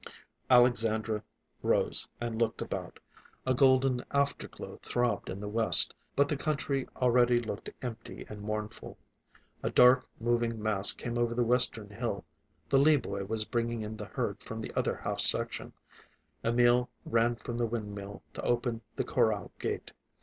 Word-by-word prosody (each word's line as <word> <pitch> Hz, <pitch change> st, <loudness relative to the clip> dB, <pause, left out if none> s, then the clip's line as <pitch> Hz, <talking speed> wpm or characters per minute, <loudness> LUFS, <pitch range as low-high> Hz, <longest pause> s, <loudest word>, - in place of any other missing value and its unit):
Alexandra 115 Hz, -4 st, +2 dB, 0.4 s
rose -, -, +1 dB
and 120 Hz, -1 st, -4 dB
looked 115 Hz, -1 st, -1 dB
about. -, -, -6 dB, 0.5 s
A 130 Hz, -, +1 dB
golden 130 Hz, -1 st, +2 dB
afterglow 140 Hz, 0 st, -4 dB
throbbed 120 Hz, -5 st, -2 dB
in 95 Hz, -, -6 dB
the 105 Hz, -, -7 dB
west, 110 Hz, +2 st, +7 dB, 0.2 s
but 140 Hz, 0 st, +2 dB
the 150 Hz, -, -2 dB
country 140 Hz, -2 st, -3 dB
already 125 Hz, -1 st, +2 dB
looked 110 Hz, -3 st, -7 dB
empty 115 Hz, -2 st, -8 dB
and 105 Hz, -1 st, -10 dB
mournful. 105 Hz, 0 st, -6 dB, 0.6 s
A -, -, -2 dB
dark 125 Hz, +1 st, +4 dB
moving 115 Hz, -1 st, -1 dB
mass 105 Hz, -2 st, +3 dB
came 120 Hz, 0 st, -5 dB
over 120 Hz, 0 st, -1 dB
the 120 Hz, -, +1 dB
western 115 Hz, -3 st, 0 dB
hill, 100 Hz, -, -5 dB, 0.4 s
the 135 Hz, -, +2 dB
Lee 150 Hz, +2 st, +4 dB
boy 100 Hz, -6 st, -6 dB
was 110 Hz, +1 st, -3 dB
bringing 115 Hz, -1 st, -3 dB
in 110 Hz, +1 st, -7 dB
the 105 Hz, -, -7 dB
herd -, -, -5 dB
from -, -, -8 dB
the -, -, -7 dB
other -, -, -1 dB
half -, -, -5 dB
section. -, -, +8 dB, 0.7 s
Emil 120 Hz, +1 st, +2 dB, 0.2 s
ran 115 Hz, +1 st, 0 dB
from 120 Hz, 0 st, -7 dB
the 120 Hz, -1 st, -1 dB
windmill 105 Hz, -3 st, -7 dB
to -, -, -7 dB
open 120 Hz, -1 st, -2 dB
the -, -, -2 dB
corral 110 Hz, -6 st, -1 dB
gate. -, -, -5 dB
120 Hz, 155 wpm, -29 LUFS, 110-125 Hz, 0.7 s, section